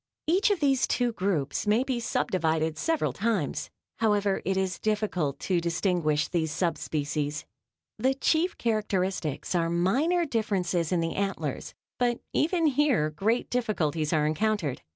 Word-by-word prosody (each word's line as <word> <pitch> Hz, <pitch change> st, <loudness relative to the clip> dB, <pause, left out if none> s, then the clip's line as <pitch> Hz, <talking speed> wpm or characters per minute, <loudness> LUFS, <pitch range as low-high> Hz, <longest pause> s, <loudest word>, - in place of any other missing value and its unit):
Each 375 Hz, +6 st, +3 dB
of 405 Hz, -4 st, +1 dB
these 270 Hz, -3 st, +3 dB
two 245 Hz, -1 st, +1 dB
groups 185 Hz, -5 st, -1 dB
may 215 Hz, +4 st, +3 dB
be 260 Hz, -2 st, -2 dB
sub 235 Hz, -, -1 dB
divided 160 Hz, -3 st, +1 dB
several 325 Hz, -, 0 dB
times. 200 Hz, -, -1 dB, 0.3 s
However, 205 Hz, -3 st, +2 dB
it 190 Hz, 0 st, 0 dB
is 190 Hz, -2 st, -1 dB
difficult 205 Hz, -9 st, -1 dB
to 180 Hz, -3 st, +1 dB
distinguish 170 Hz, -3 st, +1 dB
these 160 Hz, -3 st, -1 dB
sub 165 Hz, 0 st, -1 dB
species. 150 Hz, 0 st, -2 dB, 0.5 s
The 260 Hz, +4 st, +2 dB
chief 320 Hz, +6 st, +1 dB
characteristics 195 Hz, -, -1 dB
are 165 Hz, -2 st, +1 dB
minor 270 Hz, -, +2 dB
differences 195 Hz, -, 0 dB
in 175 Hz, -2 st, +2 dB
the 165 Hz, 0 st, -1 dB
antlers, 190 Hz, -8 st, -3 dB, 0.2 s
but 240 Hz, -1 st, +1 dB
even 335 Hz, +2 st, +2 dB
here 270 Hz, -, +2 dB
great 215 Hz, +10 st, 0 dB
difficulties 165 Hz, -11 st, 0 dB
are 150 Hz, -1 st, +2 dB
encountered. 160 Hz, -2 st, 0 dB
190 Hz, 145 wpm, -27 LUFS, 160-240 Hz, 0.5 s, Each